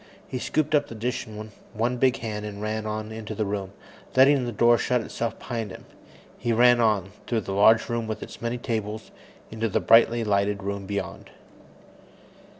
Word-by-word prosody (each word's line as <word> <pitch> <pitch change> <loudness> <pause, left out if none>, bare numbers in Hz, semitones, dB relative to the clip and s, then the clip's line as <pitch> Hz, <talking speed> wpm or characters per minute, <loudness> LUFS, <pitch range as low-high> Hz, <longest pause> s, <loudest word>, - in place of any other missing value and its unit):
He 125 - -4
scooped 155 +4 -1
up 145 -1 +3
the 115 - -9
dish 120 +2 -3
in 110 0 -8 0.2
one 120 +3 0
big 130 0 +3
hand 105 -2 -4
and 105 -1 -6
ran 110 +1 -3
on 110 0 -4
into 110 -1 -6
the 110 - -1
room, 100 -1 -3 0.4
letting 135 0 +5
the 120 - -3
door 120 +2 +4
shut 125 -1 +1
itself 115 +1 -4
behind 115 -4 -4
him. 95 - -11 0.5
He 120 - -1
ran 120 +1 +5
on, 105 -4 +2 0.2
through 115 -2 0
the 95 - -5
large 110 +3 +5
room 115 -1 -2
with 110 - -4
its - - -11
many 115 +1 -2
tables, 110 -3 -4 0.4
into 110 0 -2
the - - +1
brightly 115 +1 +5
lighted 100 -1 0
room 100 0 -4
beyond. 100 0 -5
110 Hz, 185 wpm, -25 LUFS, 105-120 Hz, 0.5 s, letting